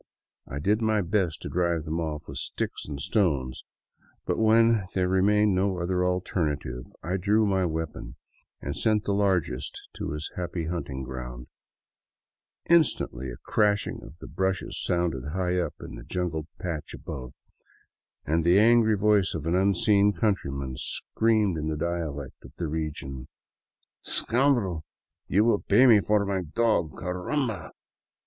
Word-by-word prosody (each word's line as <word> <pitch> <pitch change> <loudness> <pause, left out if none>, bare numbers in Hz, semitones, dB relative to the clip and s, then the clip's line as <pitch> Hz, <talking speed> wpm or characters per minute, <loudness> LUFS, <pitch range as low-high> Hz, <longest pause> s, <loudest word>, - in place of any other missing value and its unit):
I 70 - -6
did 105 +9 +1
my 110 -1 +2
best 90 -2 -1
to - - -4
drive 85 -2 0
them 80 +1 -3
off 75 -2 -3
with 70 - -6
sticks - - -4
and 70 -2 -5
stones, 70 - 0 0.6
but - - -1
when 110 -1 +4
there 90 -1 +2
remained 100 +2 +3
no 95 0 +1
other 90 +1 0
alternative 75 -8 -1 0.2
I 90 +3 -1
drew 105 +4 +3
my 95 -2 +2
weapon 80 -2 -4 0.5
and - - -4
sent 110 -1 +1
the 100 - 0
largest 90 -10 0 0.2
to - - -3
his 75 +1 -5
happy 85 -2 -3
hunting 80 -6 -4
grounds. 60 -1 -7 1.2
Instantly 135 - +2
a - - -7
crashing 105 -1 +1
of 80 - -12
the - - -11
bushes 95 0 -2
sounded 85 -5 -1
high 90 -1 0
up 85 - -2
in - - -8
a - - -10
jungled 80 -2 -3
patch 85 -5 -4
above, 65 -1 -7 0.9
and 80 +2 +1
the 85 +3 +5
angry 110 0 +5
voice 100 -2 +3
of 80 -2 -4
an 85 - 0
unseen 100 +2 +3
countryman 70 -12 -1
screamed 110 -3 +1
in 75 - -3
the 80 -1 -2
dialect 75 -5 -4
of - - -14
the 85 - -3
region: 75 -4 -4 0.4
" - - -47
Scoundrel, 120 - +1 0.4
you 105 +4 +3
'11 115 -3 +2
pay 110 +6 +7
me 110 -5 +7
for 105 0 +2
my 95 -1 -1
dog, 90 -2 0
caramba 90 - -2
90 Hz, 150 wpm, -27 LUFS, 75-105 Hz, 1.2 s, pay